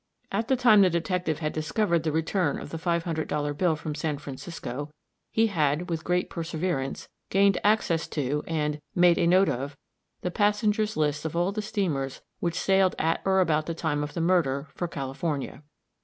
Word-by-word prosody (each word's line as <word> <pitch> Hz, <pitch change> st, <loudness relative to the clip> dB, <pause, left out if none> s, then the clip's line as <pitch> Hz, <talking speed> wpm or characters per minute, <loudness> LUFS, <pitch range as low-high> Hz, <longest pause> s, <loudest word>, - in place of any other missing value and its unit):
At 220 Hz, +4 st, -1 dB
the 265 Hz, -, +3 dB
time 235 Hz, -5 st, +6 dB
the 190 Hz, -, +6 dB
detective 170 Hz, -1 st, -1 dB
had 155 Hz, -1 st, -2 dB
discovered 170 Hz, +2 st, +1 dB
the 155 Hz, -1 st, -1 dB
return 160 Hz, 0 st, 0 dB
of -, -, -9 dB
the 165 Hz, -, -4 dB
five 170 Hz, 0 st, 0 dB
hundred 160 Hz, -2 st, -2 dB
dollar 145 Hz, -1 st, -1 dB
bill 165 Hz, +2 st, +1 dB
from 150 Hz, 0 st, -5 dB
San 150 Hz, 0 st, -2 dB
Francisco, 145 Hz, -1 st, -6 dB, 0.4 s
he 225 Hz, -, +3 dB
had, 170 Hz, -3 st, 0 dB
with 165 Hz, -1 st, -2 dB
great 180 Hz, 0 st, +1 dB
perseverance, 165 Hz, -4 st, -3 dB, 0.2 s
gained 195 Hz, 0 st, +4 dB
access 205 Hz, -6 st, +2 dB
to, 145 Hz, 0 st, -2 dB
and 150 Hz, -2 st, -1 dB
"made 175 Hz, -1 st, +5 dB
a 170 Hz, -, +3 dB
note 185 Hz, +2 st, +5 dB
of" 140 Hz, +3 st, -3 dB, 0.4 s
the 180 Hz, -, -2 dB
passengers' 210 Hz, +1 st, +1 dB
lists 150 Hz, -1 st, 0 dB
of 160 Hz, 0 st, -4 dB
all 175 Hz, +3 st, +1 dB
the 215 Hz, +1 st, -3 dB
steamers 165 Hz, -, -2 dB, 0.2 s
which 170 Hz, 0 st, -1 dB
sailed 190 Hz, -1 st, +3 dB
at 165 Hz, +1 st, +1 dB
or 190 Hz, 0 st, +4 dB
about 155 Hz, -3 st, +1 dB
the 165 Hz, -, -2 dB
time 155 Hz, -3 st, -1 dB
of 145 Hz, -, -6 dB
the 170 Hz, -, -1 dB
murder, 155 Hz, -5 st, +1 dB
for 175 Hz, -, -3 dB
California. 140 Hz, -1 st, -4 dB
165 Hz, 185 wpm, -27 LUFS, 150-185 Hz, 0.4 s, time